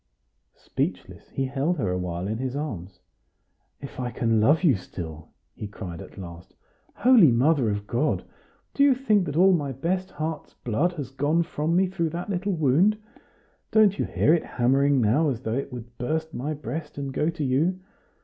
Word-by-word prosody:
Speechless, - - -4
he 135 - -2
held 140 +6 -1
her 100 -10 -1
a 90 - -1
while 90 0 -3
in 110 +2 -3
his 130 0 -3
arms. 100 - -5 0.8
"If 140 -1 -9
I 125 -1 -2
can 115 -2 +1
love 150 - +4
you 150 -8 +5
still!" 80 -4 -8 0.2
he 105 - -7
cried 95 -5 -8
at - - -12
last. 85 -2 -10 0.4
"Holy 225 - +6
Mother 130 0 +3
of 105 0 -3
God! 120 +8 0 0.5
Do - - -1
you 280 -2 +5
think 215 -7 +2
that 145 - -4
all 190 +3 +6
my 145 -5 0
best 180 +8 -2
heart's 155 0 -5
blood 145 +10 -1
has 140 -6 -6
gone 145 +5 +1
from 160 +1 -2
me 190 +2 +4
through 180 -3 -2
that 175 +5 -5
little 195 +2 -1
wound? 165 +7 +3 0.7
Don't 210 -2 +4
you - - +1
hear 155 - +2
it 170 - +2
hammering 135 +3 +2
now, 135 +9 +3
as 125 -3 -3
though 110 -3 -3
it 135 +2 -3
would 120 -1 -9
burst 160 +6 -2
my 145 +6 -3
breast 150 +1 -6
and 140 -1 -4
go 150 - +1
to 165 -2 -4
you? 155 +8 +1
145 Hz, 190 wpm, -25 LUFS, 120-170 Hz, 0.8 s, Holy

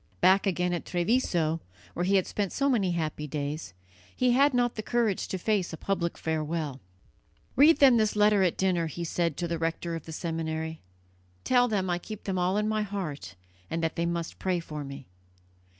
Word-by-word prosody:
Back 190 +3 +5
again 180 -1 0
at 175 - -2
Treviso, 175 -4 +1 0.3
where 175 - -1
he 195 +2 +3
had 190 - +3
spent 200 -3 -2
so 280 - 0
many 195 -8 +1
happy 155 -2 -3
days, 145 - -4 0.4
he 250 -1 +3
had 280 +4 +5
not 245 -2 +1
the 215 - -4
courage 225 -3 0
to 190 - -3
face 195 -2 0
a - - -5
public 170 -3 -2
farewell. 155 -3 -2 0.8
"Read 300 +4 +7
them 270 -5 +7
this 215 -2 +2
letter 210 -1 +4
at 180 -3 +2
dinner," 180 -3 +1
he 170 +2 -5
said 170 -2 -1
to 175 - -2
the 170 -1 -2
rector 165 +1 -2
of 165 -2 -5
the - - -6
seminary; 160 -1 -3 0.6
"tell 245 -1 +4
them 200 -5 0
I 175 -1 0
keep 215 +3 -8
them 190 -2 -2
all 180 +3 +1
in 210 0 +1
my 215 0 0
heart, 175 - -5 0.3
and 165 0 -2
that 160 - 0
they 170 0 0
must 170 -1 -3
pray 185 -2 0
for 150 -3 -6
me." 140 -1 -8
175 Hz, 200 wpm, -28 LUFS, 160-210 Hz, 0.8 s, Read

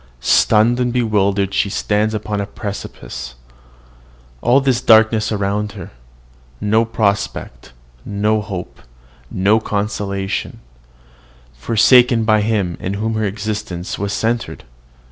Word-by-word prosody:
Stunned 110 - +3
and 125 -1 0
bewildered, 100 -5 +1
she 100 - +1
stands 105 +2 0
upon 105 -1 -3
a 100 - -4
precipice. 65 - -7 1.1
All 135 +3 +3
is 125 -2 +2
darkness 110 -1 +4
around 105 0 -1
her. - - -9 0.7
No 110 +2 +2
prospect, 100 - -2 0.3
no 105 +1 0
hope, 95 -4 -7 0.5
no 100 +4 +2
consolation 100 -2 -3 0.9
forsaken 115 - +4
by 110 -1 +3
him 105 -5 -1
in 95 +2 -3
whom 110 +2 -2
her 110 -1 -1
existence 105 -3 -4
was 100 0 -2
centred! 115 +2 -2
105 Hz, 110 wpm, -18 LUFS, 100-110 Hz, 1.1 s, darkness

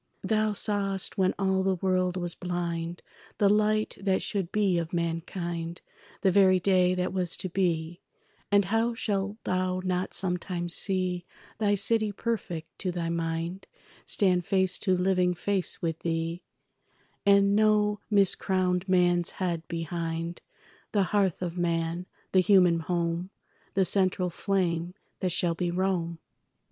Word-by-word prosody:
Thou 215 -1 +1
sawest, 200 -2 +1
when 185 0 +2
all 190 -1 +1
the 190 0 +1
world 185 0 0
was 175 -1 -1
blind, 170 -1 -4 0.3
The 200 - +4
light 215 +1 +1
that 195 -1 +1
should 195 -5 -2
be 195 -5 +2
of 165 0 -5
mankind, 170 0 -3 0.4
The 190 - +3
very 185 -1 +5
day 185 -1 +3
that 180 0 -1
was 180 -2 -1
to 185 - -4
be; 170 -2 -1 0.5
And 200 -1 +4
how 225 +4 +1
shalt 200 -2 -2
thou 185 0 0
not 185 0 -1
sometime 180 -1 -1
see 185 0 0 0.3
Thy 205 -2 +2
city 215 +1 +2
perfect 190 -7 -4
to 185 - -1
thy 170 -1 -3
mind 165 +2 -3 0.4
Stand 180 -3 +2
face 190 0 +1
to 185 -3 +1
living 180 -1 +2
face 190 -1 -2
with 165 -1 -1
thee, 165 +1 -2 0.8
And 200 0 +5
no 210 -1 +3
miscrowned 190 -2 +2
man's 175 -1 +3
head 175 -3 -1
behind; 165 0 -4 0.5
The 205 -2 +3
hearth 195 -4 +1
of 175 0 -4
man, 170 +1 -1 0.2
the 190 - +4
human 180 -3 +5
home, 170 +1 -2 0.5
The 190 -1 +3
central 185 -2 +1
flame 175 -2 -1 0.2
that 185 -2 -1
shall 170 0 +1
be 175 +1 -2
Rome? 175 -2 -1
185 Hz, 140 wpm, -28 LUFS, 170-195 Hz, 0.8 s, very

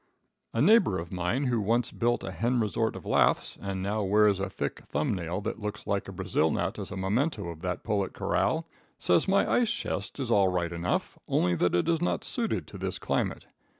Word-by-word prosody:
A - - +1
neighbor 210 - +5
of 85 0 -6
mine 90 +9 -1
who 120 -3 +1
once 115 +3 +1
built 120 0 0
a 95 - -4
hen 120 +6 0
resort 110 0 0
of - - -9
laths, 65 +2 +2
and 95 -1 -3
now 105 +2 -1
wears 105 0 +4
a 95 0 -2
thick - - -4
thumb 75 +8 0
nail 90 +1 -3
that 110 - -4
looks 105 0 -5
like 100 -1 -1
a - - -6
Brazil 80 - +1
nut - - -1
as - - -5
a 100 - -6
memento 105 - 0
of 80 -1 -8
that 90 -1 -3
pullet 100 -3 0
corral, - - 0 0.3
says 90 - +2
my 195 +1 +3
ice 240 -2 +3
chest - - -3
is 130 -3 -2
all 100 -4 +5
right 90 -2 0
enough, 85 +1 -2
only 90 0 +2
that 90 0 +2
it 85 - +1
is 165 -1 +2
not 175 - 0
suited 235 -3 -1
to - - -10
this - - -2
climate. - - -1
100 Hz, 215 wpm, -28 LUFS, 90-115 Hz, 0.3 s, neighbor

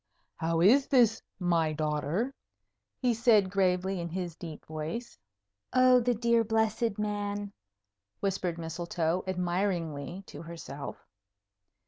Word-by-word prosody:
"How 165 0 0
is 255 +10 +6
this, 235 -4 +4 0.2
my 170 -4 +1
daughter?" 155 - -1 0.7
he 250 -2 +2
said 220 -4 +4
gravely, 190 -1 +1
in 170 0 -3
his 175 -1 -4
deep 160 -3 -9
voice. 160 +10 -5 0.6
"Oh, 255 0 +6
the 245 0 +1
dear 235 +1 +3
blessed 220 0 +1
man!" 205 -1 -2 0.7
whispered 185 -3 -1
Mistletoe, 170 +1 -2
admiringly, 175 -2 -2
to 145 - -10
herself. 165 -4 -8
185 Hz, 110 wpm, -30 LUFS, 165-220 Hz, 0.7 s, is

